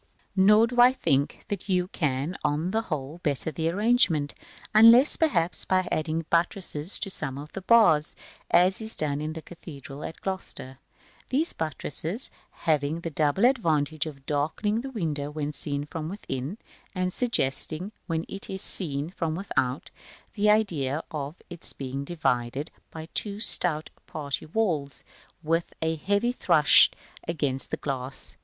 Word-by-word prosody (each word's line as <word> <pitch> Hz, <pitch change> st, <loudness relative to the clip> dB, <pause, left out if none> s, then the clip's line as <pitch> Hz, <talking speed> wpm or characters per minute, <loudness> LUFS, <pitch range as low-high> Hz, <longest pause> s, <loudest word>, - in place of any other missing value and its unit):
Nor 210 Hz, +3 st, +6 dB
do 245 Hz, +1 st, +2 dB
I 250 Hz, +1 st, +7 dB
think 140 Hz, -, -1 dB
that 200 Hz, 0 st, -5 dB
you 180 Hz, -1 st, +1 dB
can, 145 Hz, -1 st, -2 dB
on 155 Hz, +5 st, 0 dB
the 220 Hz, +2 st, +1 dB
whole, 155 Hz, -5 st, -5 dB
better 150 Hz, 0 st, 0 dB
the 160 Hz, +2 st, -1 dB
arrangement, 185 Hz, -, +2 dB, 0.4 s
unless, 230 Hz, +6 st, +7 dB
perhaps, 180 Hz, -, +2 dB
by 185 Hz, -1 st, +1 dB
adding 155 Hz, +1 st, -1 dB
buttresses 170 Hz, -1 st, +2 dB
to 195 Hz, -, -1 dB
some 135 Hz, -6 st, +1 dB
of 145 Hz, +2 st, -9 dB
the 195 Hz, -, -7 dB
bars, 190 Hz, -8 st, +4 dB, 0.3 s
as 185 Hz, +4 st, +3 dB
is 220 Hz, 0 st, 0 dB
done 150 Hz, -1 st, -1 dB
in 155 Hz, +1 st, -4 dB
the 160 Hz, -1 st, -8 dB
cathedral 145 Hz, -5 st, -10 dB
at -, -, -7 dB
Gloucester; 160 Hz, -8 st, -6 dB, 0.5 s
these 295 Hz, +6 st, 0 dB
buttresses 160 Hz, -, -1 dB, 0.3 s
having 155 Hz, +1 st, +1 dB
the 165 Hz, -, -5 dB
double 155 Hz, +8 st, +2 dB
advantage 160 Hz, -, +1 dB
of 135 Hz, -3 st, -10 dB
darkening 160 Hz, +10 st, -1 dB
the 270 Hz, -, -6 dB
window 155 Hz, -, -3 dB
when 150 Hz, 0 st, -4 dB
seen 145 Hz, -1 st, -3 dB
from 155 Hz, 0 st, -6 dB
within, 155 Hz, -3 st, -5 dB, 0.4 s
and 185 Hz, 0 st, -1 dB
suggesting, 185 Hz, -, 0 dB, 0.2 s
when 165 Hz, -2 st, -2 dB
it 195 Hz, -, -4 dB
is 190 Hz, 0 st, -4 dB
seen 150 Hz, -3 st, 0 dB
from 165 Hz, -4 st, -3 dB
without, 135 Hz, -8 st, -2 dB, 0.4 s
the 210 Hz, 0 st, +2 dB
idea 165 Hz, -9 st, +1 dB
of 145 Hz, 0 st, -5 dB
its 175 Hz, -2 st, -1 dB
being 135 Hz, 0 st, -5 dB
divided 140 Hz, -3 st, -2 dB, 0.2 s
by 160 Hz, 0 st, -9 dB
two 205 Hz, -1 st, -3 dB
stout 165 Hz, -7 st, +5 dB, 0.2 s
party 145 Hz, -1 st, -5 dB
walls, 155 Hz, -8 st, -2 dB, 0.4 s
with 165 Hz, +2 st, -1 dB
a 160 Hz, 0 st, -1 dB
heavy 200 Hz, +8 st, 0 dB
thrust 170 Hz, -, +5 dB, 0.3 s
against 140 Hz, -5 st, -1 dB
the -, -, -3 dB
glass. 135 Hz, -1 st, -5 dB
160 Hz, 150 wpm, -26 LUFS, 145-195 Hz, 0.5 s, I